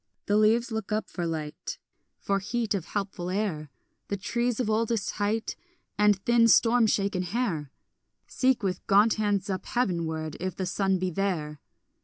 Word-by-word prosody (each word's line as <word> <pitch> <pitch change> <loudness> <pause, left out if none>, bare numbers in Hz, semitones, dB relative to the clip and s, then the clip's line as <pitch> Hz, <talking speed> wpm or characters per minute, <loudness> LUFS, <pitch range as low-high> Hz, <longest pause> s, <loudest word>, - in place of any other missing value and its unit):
The 205 - +1
leaves 225 +3 +3
look 220 -2 -4
up 215 +1 -1
for 175 -2 -3
light, 155 -2 -5 0.4
For 195 0 0
heat 225 +2 -1
of 190 -5 -2
helpful 195 -3 -4
air; 185 -7 -2 0.4
The 200 - -2
trees 235 +4 -1
of 250 - 0
oldest 220 -1 0
height 215 +2 -1 0.4
And 210 0 +4
thin 235 -1 +5
storm 230 0 +5
shaken 200 -3 +1
hair 180 - -2 0.6
Seek 255 -3 +1
with 185 -2 -2
gaunt 205 +3 +5
hands 205 -2 +1
up 190 -2 -3
heavenward 165 -9 -1
if 185 0 -3
the 190 - -3
sun 190 +1 +1
be 185 0 -2
there. 160 -5 -2
200 Hz, 160 wpm, -27 LUFS, 180-220 Hz, 0.6 s, thin